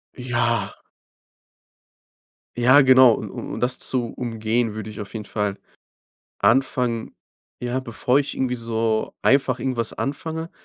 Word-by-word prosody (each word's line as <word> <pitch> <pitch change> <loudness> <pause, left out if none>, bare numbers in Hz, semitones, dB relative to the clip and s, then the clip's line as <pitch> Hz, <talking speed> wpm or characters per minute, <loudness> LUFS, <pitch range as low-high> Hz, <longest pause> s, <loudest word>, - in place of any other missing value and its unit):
Ja. 120 -4 -1 1.8
Ja, 125 +4 +6
genau. 130 -2 +7
Un - - -6
u - - -7
um - - -5
das 125 +1 0
zu 125 -3 0
umgehen, 115 -1 -1
würde 110 0 -6
ich 110 +1 -9
auf 100 - -9
jeden 110 -2 -6
Fall 105 -2 -2 0.8
anfangen 120 +1 +1 0.5
ja, 125 +1 -2
bevor 125 +1 +1
ich 145 - -3
irgendwie 130 -1 0
so 115 -2 -2
einfach 135 -2 +3
irgendwas 120 -2 -2
anfange, 160 +4 -4
120 Hz, 130 wpm, -22 LUFS, 110-130 Hz, 1.8 s, genau